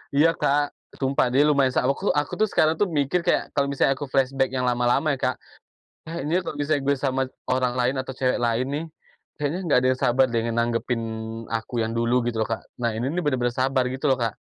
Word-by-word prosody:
Iya, 155 Hz, +4 st, +5 dB
Kak, 145 Hz, +1 st, +1 dB, 0.2 s
sumpah. 135 Hz, -2 st, +1 dB
Dia, 145 Hz, +4 st, +4 dB
lumayan 140 Hz, -3 st, +3 dB
sa 125 Hz, -, +1 dB
aku 140 Hz, +9 st, +1 dB
aku 145 Hz, 0 st, -1 dB
tuh, 215 Hz, -, +4 dB
sekarang 155 Hz, +1 st, +3 dB
tuh 205 Hz, -, +1 dB, 0.2 s
mikir 170 Hz, +5 st, 0 dB
kayak, -, -, 0 dB
kalau 140 Hz, -1 st, +2 dB
misalnya 135 Hz, 0 st, +2 dB
aku 140 Hz, -2 st, -7 dB
flashback 135 Hz, 0 st, +1 dB
yang 130 Hz, -1 st, -1 dB
lama-lama 125 Hz, +5 st, +2 dB
ya 130 Hz, -, -13 dB
Kak, 130 Hz, -, +1 dB, 0.7 s
"Eh, 170 Hz, -1 st, -4 dB
ini 170 Hz, +5 st, +1 dB
kalo 155 Hz, -4 st, -6 dB
misalnya 145 Hz, 0 st, 0 dB
gua 140 Hz, -, +4 dB
sama 135 Hz, -1 st, 0 dB, 0.2 s
orang 130 Hz, -1 st, +1 dB
lain, 125 Hz, +2 st, +1 dB
atau 130 Hz, -, -12 dB
cewek 130 Hz, -1 st, +1 dB
lain 120 Hz, +1 st, +1 dB
nih, 155 Hz, +3 st, -2 dB, 0.5 s
kayaknya 150 Hz, +5 st, -2 dB
enggak 165 Hz, -8 st, +2 dB
ada -, -, +5 dB
yang 130 Hz, -, -10 dB
sabar 130 Hz, +2 st, +4 dB
deh, 115 Hz, -, +2 dB
nanggepin 115 Hz, +1 st, 0 dB, 0.4 s
aku 115 Hz, +2 st, -4 dB
yang 115 Hz, -, -4 dB
dulu." 115 Hz, +1 st, +1 dB
Gitu 115 Hz, -2 st, -1 dB
loh, 110 Hz, -, -1 dB
Kak. 115 Hz, -, -3 dB, 0.2 s
Nah, 120 Hz, -, +2 dB
ini 120 Hz, -, -2 dB
nih 180 Hz, -, 0 dB
benar-benar 125 Hz, -5 st, 0 dB
sabar, 130 Hz, +1 st, +1 dB
gitu 130 Hz, +3 st, -4 dB
loh, 130 Hz, -, +3 dB
Kak. 115 Hz, -4 st, -1 dB
130 Hz, 225 wpm, -24 LUFS, 120-145 Hz, 0.7 s, Iya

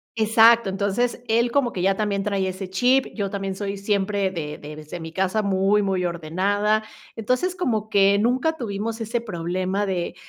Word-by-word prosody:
Exacto, 225 Hz, -1 st, +5 dB
entonces 205 Hz, +6 st, -1 dB
él 235 Hz, +2 st, +2 dB
como 275 Hz, -4 st, +2 dB
que 180 Hz, -, -4 dB
ya 195 Hz, +1 st, +2 dB
también 205 Hz, -2 st, -1 dB
trae 200 Hz, -2 st, -1 dB
ese 185 Hz, 0 st, -5 dB
chip, 250 Hz, +7 st, +3 dB
yo 200 Hz, -3 st, -2 dB
también 195 Hz, -1 st, -4 dB
soy 200 Hz, 0 st, -4 dB
siempre 200 Hz, -1 st, 0 dB
de 150 Hz, -4 st, -5 dB
de 150 Hz, +1 st, -9 dB
desde 155 Hz, +3 st, -8 dB
mi 160 Hz, 0 st, -8 dB
casa 190 Hz, +4 st, 0 dB
muy, 200 Hz, +1 st, +2 dB
muy 190 Hz, -2 st, 0 dB
ordenada. 195 Hz, +6 st, 0 dB, 0.3 s
Entonces, 255 Hz, -, -1 dB
como 220 Hz, -, -1 dB
que 200 Hz, -1 st, +4 dB
nunca 260 Hz, +8 st, +1 dB
tuvimos 225 Hz, 0 st, -4 dB
ese 230 Hz, +1 st, -2 dB
problema 185 Hz, 0 st, -2 dB
de, 180 Hz, -2 st, -3 dB
200 Hz, 175 wpm, -23 LUFS, 190-225 Hz, 0.3 s, Exacto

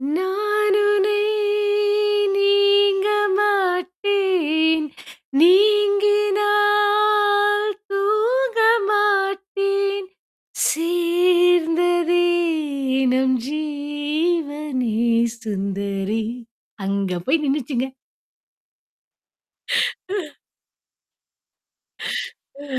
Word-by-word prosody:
நானுனை 415 Hz, +1 st, +1 dB, 1.2 s
நீங்க 400 Hz, 0 st, +3 dB, 0.3 s
மாட்டேன், 365 Hz, -5 st, 0 dB, 0.5 s
நீங்கினால் 415 Hz, +1 st, +3 dB, 0.2 s
தூங்க 450 Hz, +4 st, 0 dB, 0.3 s
மாட்டேன் 395 Hz, -1 st, -1 dB, 0.6 s
சேர்ந்ததே 350 Hz, 0 st, +1 dB, 0.9 s
நம் 260 Hz, 0 st, +1 dB
ஜீவனே 295 Hz, -3 st, -3 dB, 0.5 s
சுந்தரி, 200 Hz, +1 st, -3 dB, 0.6 s
அங்க 195 Hz, -2 st, -2 dB
போய் 305 Hz, +3 st, +1 dB
நின்னுச்சுங்க. 270 Hz, -2 st, -2 dB, 1.9 s
ஆ. 380 Hz, -8 st, -3 dB, 2.1 s
ஆ, 285 Hz, +1 st, -16 dB
375 Hz, 40 wpm, -20 LUFS, 305-410 Hz, 2.1 s, நீங்க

